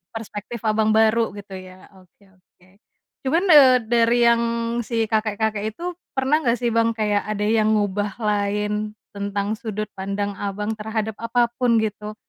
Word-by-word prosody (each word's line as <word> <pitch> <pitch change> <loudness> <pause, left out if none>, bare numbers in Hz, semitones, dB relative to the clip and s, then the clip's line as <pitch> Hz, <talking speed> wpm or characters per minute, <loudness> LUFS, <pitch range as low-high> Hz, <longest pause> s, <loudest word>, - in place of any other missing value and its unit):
perspektif 225 +1 -7
Abang 215 0 +2
baru 220 -1 +3
gitu 200 -2 -9
ya. 185 0 -14
Oke 185 +2 -25
oke. 185 +1 -28 0.5
Cuman, 330 +7 +2
eee, 270 -4 +8
dari 235 +1 +2
yang 235 0 +4 0.4
si 230 -1 -1
kakek-kakek 215 0 -1
itu 355 +1 -4 0.2
pernah 265 +3 +2
nggak 240 -6 +1
sih 240 0 -1
Bang, 230 0 +1
kayak 210 -2 0
ada 210 -1 -2
yang 215 0 +2
ngubah 205 -1 -1
lain, 210 0 -1 0.2
tentang 200 +1 -3
sudut 215 -2 -5
pandang 200 +1 -4
Abang, 205 +2 -3
terhadap 220 0 -3
apa 235 +1 +1
pun 245 -2 +3
gitu? 210 0 -5
215 Hz, 150 wpm, -22 LUFS, 205-230 Hz, 0.5 s, eee